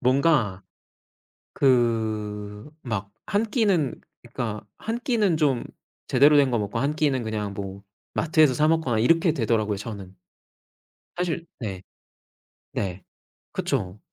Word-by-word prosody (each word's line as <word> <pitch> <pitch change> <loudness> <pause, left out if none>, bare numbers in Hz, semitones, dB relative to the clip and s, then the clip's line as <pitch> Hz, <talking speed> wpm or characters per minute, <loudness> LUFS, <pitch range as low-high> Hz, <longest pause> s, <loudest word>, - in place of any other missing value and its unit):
뭔가 130 - +2 0.9
그 110 -4 0
막 105 -5 -4 0.2
1 205 +2 +2
끼는 200 - +1 0.2
그니까 115 -3 -4 0.2
1 225 +2 -3
끼는 215 -9 +2
좀 145 -6 +1 0.4
제대로 145 +3 +6
된 140 -2 +5
거 120 - +1
먹고 105 +2 -2
1 145 +4 0
끼는 140 -5 +1
그냥 105 -2 -3
뭐 100 0 -6 0.3
마트에서 155 -3 +4
사먹거나 150 -5 +2
이렇게 165 +7 +4
되더라고요 110 -6 +1
저는. 100 -3 -7 1.0
사실 170 -1 -2
네. 95 -5 -5 0.9
네. 95 -1 -3 0.5
그쵸. 90 +2 -2
120 Hz, 205 characters per minute, -25 LUFS, 105-155 Hz, 1.0 s, 제대로